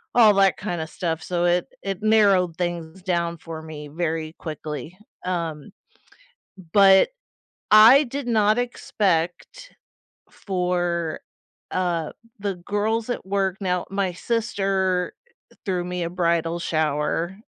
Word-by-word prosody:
all 220 Hz, -3 st, +7 dB
that 195 Hz, -4 st, +4 dB
kinda 175 Hz, -5 st, -4 dB
stuff, 165 Hz, -1 st, -3 dB
so 175 Hz, -1 st, -1 dB
it 175 Hz, 0 st, +2 dB, 0.2 s
it 195 Hz, 0 st, -4 dB
narrowed 200 Hz, -6 st, +3 dB
things 175 Hz, 0 st, -4 dB
down 170 Hz, -2 st, -1 dB
for 160 Hz, 0 st, -8 dB
me 155 Hz, -2 st, -8 dB
very 160 Hz, 0 st, -3 dB
quickly, 155 Hz, +2 st, -6 dB, 0.3 s
um 165 Hz, -5 st, -3 dB, 1.0 s
but 195 Hz, -, +6 dB, 0.6 s
I 230 Hz, +7 st, +8 dB
did 275 Hz, +1 st, -5 dB
not 215 Hz, -1 st, +3 dB
expect 210 Hz, -, -2 dB, 0.6 s
for, 175 Hz, -3 st, -2 dB, 0.5 s
uh, 175 Hz, -4 st, -1 dB, 0.3 s
the 200 Hz, -3 st, -2 dB
girls 210 Hz, +5 st, -1 dB
at 245 Hz, -, -3 dB
work 195 Hz, -1 st, 0 dB
now 180 Hz, -2 st, -1 dB
my 195 Hz, -2 st, -1 dB
sister 195 Hz, -4 st, -1 dB, 0.5 s
threw 180 Hz, -2 st, -1 dB
me 180 Hz, 0 st, -3 dB
a 170 Hz, -, -3 dB
bridal 170 Hz, -1 st, 0 dB
shower, 160 Hz, +3 st, -1 dB
180 Hz, 115 wpm, -23 LUFS, 170-200 Hz, 1.0 s, I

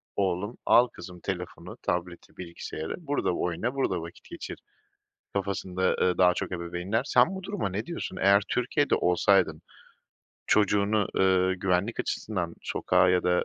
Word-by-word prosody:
oğlum 100 Hz, +3 st, -1 dB
al 120 Hz, +1 st, +6 dB
kızım 90 Hz, -4 st, -11 dB
telefonu, 90 Hz, -2 st, -6 dB
tableti, 90 Hz, 0 st, -3 dB
bilgisayarı; 85 Hz, -2 st, -6 dB
burada 145 Hz, -, -1 dB
oyna, 90 Hz, +9 st, -2 dB
burada 95 Hz, -10 st, 0 dB
vakit 85 Hz, +1 st, -11 dB
geçir -, -, -7 dB, 0.8 s
kafasında, 95 Hz, -2 st, -1 dB
ııı, 90 Hz, -1 st, +2 dB
daha 90 Hz, -1 st, +5 dB
çok -, -, -4 dB
ebeveynler. 90 Hz, +5 st, -2 dB
Sen 190 Hz, -, +4 dB
bu 190 Hz, -, -6 dB
duruma 200 Hz, -, -2 dB
ne 100 Hz, +4 st, -3 dB
diyorsun? 170 Hz, 0 st, -5 dB
Eğer 100 Hz, +1 st, +5 dB
Türkiye'de 130 Hz, +4 st, +1 dB
olsaydın, 90 Hz, -2 st, +2 dB, 0.8 s
çocuğunu, 105 Hz, 0 st, +2 dB
ııı, 95 Hz, 0 st, +3 dB
güvenlik 95 Hz, +4 st, 0 dB
açısından 90 Hz, -6 st, -3 dB
sokağa 90 Hz, -, +2 dB
ya 90 Hz, 0 st, +3 dB
da 90 Hz, 0 st, +2 dB
95 Hz, 140 wpm, -27 LUFS, 90-105 Hz, 0.8 s, al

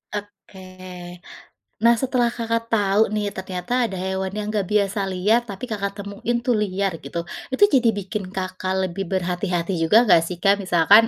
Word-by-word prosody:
Oke. 185 Hz, -3 st, -9 dB, 0.6 s
Nah, 235 Hz, +1 st, +5 dB
setelah 250 Hz, 0 st, +1 dB
Kakak 230 Hz, -1 st, -2 dB
tahu 205 Hz, 0 st, +3 dB
nih 205 Hz, -1 st, -1 dB
ternyata 190 Hz, +6 st, -2 dB
ada 195 Hz, -, -6 dB
hewan 190 Hz, +1 st, -3 dB
yang 210 Hz, 0 st, -3 dB
gak 205 Hz, -4 st, -1 dB
biasa 200 Hz, -1 st, +1 dB
liar, 190 Hz, +5 st, +2 dB
tapi 200 Hz, +3 st, -8 dB
Kakak 200 Hz, -5 st, -3 dB
temuin 200 Hz, +4 st, -2 dB
tuh 255 Hz, -, +2 dB
liar 195 Hz, -1 st, 0 dB
gitu, 170 Hz, 0 st, -5 dB, 0.3 s
itu 260 Hz, +8 st, +2 dB
jadi 250 Hz, -5 st, +4 dB
bikin 205 Hz, +1 st, -4 dB
Kakak 185 Hz, 0 st, -3 dB
lebih 185 Hz, +1 st, -3 dB
berhati-hati 180 Hz, -1 st, -1 dB
juga 210 Hz, +9 st, +5 dB
enggak 190 Hz, -7 st, +6 dB
sih 180 Hz, -, -4 dB
Kak? 200 Hz, +1 st, +4 dB
Misalkan 195 Hz, +4 st, +5 dB
200 Hz, 165 wpm, -22 LUFS, 185-220 Hz, 0.6 s, enggak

